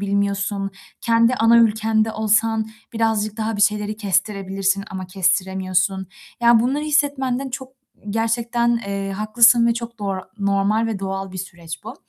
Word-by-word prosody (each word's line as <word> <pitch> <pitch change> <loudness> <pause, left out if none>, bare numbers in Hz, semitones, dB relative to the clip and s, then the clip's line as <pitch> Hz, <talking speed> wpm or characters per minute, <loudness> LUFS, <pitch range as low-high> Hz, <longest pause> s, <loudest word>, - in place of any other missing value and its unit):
bilmiyorsun, 200 0 -1 0.3
kendi 230 +1 +3
ana 230 0 +4
ülkende 220 0 +2
olsan 220 0 +1 0.3
birazcık 220 -2 0
daha 220 -1 -2
bir 205 - +1
şeyleri 210 0 +1
kestirebilirsin 195 -1 -1
ama 185 -1 -6
kestiremiyorsun, 190 +1 0 0.3
yani, 235 -1 +5
bunları 270 +5 0
hissetmenden 275 -3 0
çok 260 0 -6 0.4
gerçekten, 235 +2 0
eee, 195 0 -3
haklısın 235 +3 +4
ve 235 - +2
çok 235 0 -7
doğr 200 -2 -2 0.2
normal 200 +3 +1
ve 220 -3 -3
doğal 195 0 -4
bir 185 - -7
süreç 170 -3 -8
bu. - - -7
215 Hz, 140 wpm, -21 LUFS, 195-230 Hz, 0.4 s, yani